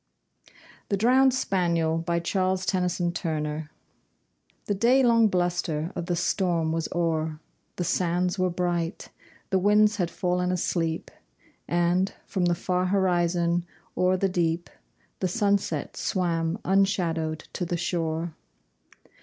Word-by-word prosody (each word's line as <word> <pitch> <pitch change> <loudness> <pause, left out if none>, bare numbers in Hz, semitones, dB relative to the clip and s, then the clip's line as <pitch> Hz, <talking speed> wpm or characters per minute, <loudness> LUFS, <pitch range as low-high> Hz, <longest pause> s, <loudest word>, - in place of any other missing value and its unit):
THE 200 - +1
DROWNED 260 +5 +5
SPANIEL 170 -9 0
The 175 -3 -1 1.1
day 245 +6 +4
long 230 -2 +5
bluster 175 -3 -1
of 175 -1 -4
the 175 - 0
storm 175 -2 0
was 165 0 -2
o'er, 160 -2 -1 0.4
The 175 - -2
sands 180 +1 0
were 185 0 +2
bright; 175 0 -2 0.4
the 190 - +3
winds 210 +2 +4
had 175 -4 0
fallen 180 +1 -1
asleep, 165 -2 -1 0.6
And, 175 +2 +1
from 185 -2 -1
the 175 0 +2
far 180 +1 -1
horizon, 175 -2 +1 0.3
o'er 185 +1 +2
the 195 - +1
deep 175 -2 -1 0.5
The 185 - 0
sunset 200 -6 0
swam 170 -2 -1
unshadowed 170 -5 +1
to - - -3
the 175 0 -2
shore. 165 -1 -2
175 Hz, 110 wpm, -26 LUFS, 165-190 Hz, 1.1 s, DROWNED